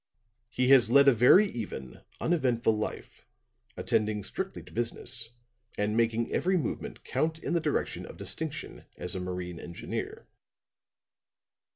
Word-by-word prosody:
He 125 +2 +1
has 130 -4 +7
led 140 +3 +6
a 135 - +8
very 125 - +7
even, 85 - -6 0.2
uneventful 125 -9 +2
life, 105 0 -5 0.5
attending 110 -3 0
strictly 190 - -4
to - - -15
business 115 -1 -2 0.5
and 105 +1 0
making 115 0 +1
every 185 +1 +2
movement 160 - -4
count 160 0 -1
in 165 - -3
the 170 - +3
direction 150 -2 -1
of - - -11
distinction - - -5
as 90 0 -4
a 95 - -3
marine 90 -1 -5
engineer. 85 -1 -6
115 Hz, 135 wpm, -29 LUFS, 105-140 Hz, 0.5 s, a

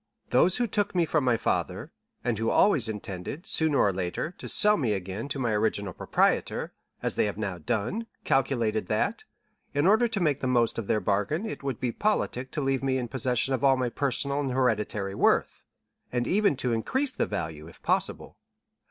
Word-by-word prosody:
Those 170 +9 +4
who 245 - +1
took 205 -3 -1
me 175 -2 +3
from 155 -2 +1
my 125 -3 +3
father, - - -2 0.3
and 120 -3 -1
who 115 0 0
always 140 - +3
intended, 105 - -6
sooner 160 -3 +1
or 100 - +3
later, 95 - -3
to - - -6
sell 210 0 +6
me 120 - 0
again 95 +5 -4
to 145 - -3
my 120 -4 0
original 105 -2 0
proprietor, - - 0 0.3
as - - +1
they - - +1
have 105 -1 -3
now 95 -5 -3
done, 125 - -2 0.2
calculated 115 -7 +1
that, - - -1 0.5
in 145 +2 +2
order 220 +5 +5
to 220 -3 -3
make 150 -6 +1
the 130 - -2
most 120 -2 +2
of 110 - -5
their 105 - +1
bargain, 105 - 0
it 220 - -5
would 135 -4 -3
be 125 - -1
politic 130 - -1
to 150 - -3
leave 135 -1 0
me 135 -1 0
in 125 -2 -3
possession 130 +1 +1
of 130 0 -1
all 135 -1 +5
my 125 -1 0
personal 140 +2 0
and 135 -3 -1
hereditary 105 -6 0
worth, - - +1 0.5
and 120 -1 0
even 200 - +2
to 125 -2 -1
increase 260 - 0
the - - -1
value, 80 -6 -5
if 85 - -15
possible. - - 0
125 Hz, 195 wpm, -27 LUFS, 105-150 Hz, 0.5 s, sell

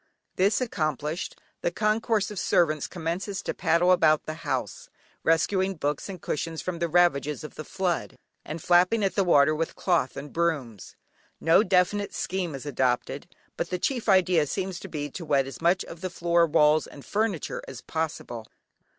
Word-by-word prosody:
This 195 +3 +3
accomplished, 155 - -2 0.2
the - - +1
concourse 215 +1 0
of 205 - -4
servants 155 -4 +2
commences 180 +3 -4
to - - -2
paddle 175 +1 +3
about 155 -4 +4
the 155 - -4
house, - - -3 0.3
rescuing 190 +4 +2
books 150 +2 -2
and 190 -2 -6
cushions 160 +1 -3
from 180 -2 -4
the 170 - 0
ravages 155 -4 +2
of 155 - -8
the 155 - -7
flood, 180 +1 -2 0.3
and 155 0 -7
flapping 180 +5 +4
at 195 - +1
the 195 - +2
water 155 -4 +5
with 160 +1 -2
cloth 170 -8 0
and 145 - -7
brooms. 145 - -2 0.4
No 165 +4 +5
definite 200 +1 +1
scheme 180 -5 -2
is 135 - -8
adopted, 130 -4 -1 0.3
but - - -2
the 180 - -1
chief 240 +4 -1
idea 180 -5 +4
seems 185 +4 -3
to - - -8
be 145 -2 -4
to 175 - -7
wet 140 -4 +2
as 135 - -9
much 175 +2 +2
of 165 - -10
the 185 - -3
floor, 170 -1 +2
walls, 150 0 +4
and 140 - -13
furniture 210 -5 -1
as 130 -3 -8
possible. 150 -8 -4
170 Hz, 175 wpm, -26 LUFS, 155-190 Hz, 0.4 s, water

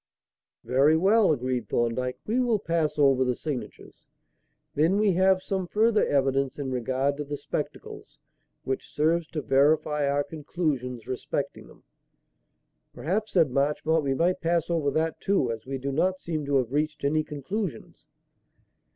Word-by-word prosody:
"Very 140 +5 +3
well," 200 +2 +4
agreed 130 -3 -2
Thorndyke; 125 +2 -1
"we 230 +4 0
will 240 -3 +2
pass 165 -6 -1
over 135 -3 +4
the 125 -1 0
signatures. 145 -3 -7 0.7
Then 165 +7 +2
we 210 -1 +3
have 190 +1 +3
some 190 -2 -2
further 220 +3 +3
evidence 135 -1 +1
in 140 -2 -4
regard 130 +3 -1
to 150 - -3
the 145 0 -5
spectacles, - - -6 0.5
which 130 - -3
serves 160 +2 +1
to 155 -3 -5
verify 150 +1 +2
our 145 +1 +1
conclusions 145 -7 -3
respecting 130 0 -4
them." - - -19 1.1
"Perhaps," 210 +7 -2
said 165 -7 +3
Marchmont, 150 +4 +1
"we 135 -1 0
might 175 +5 +1
pass 170 0 0
over 160 -4 +1
that, 160 +3 -1
too, 190 -12 +1
as 115 +1 -7
we 135 0 -3
do 135 +1 -3
not 185 +6 +1
seem 155 -5 -4
to 140 - +1
have 130 -2 +1
reached 150 0 -1
any 155 +2 +2
conclusions." 165 +6 -5
150 Hz, 150 wpm, -26 LUFS, 135-170 Hz, 1.1 s, well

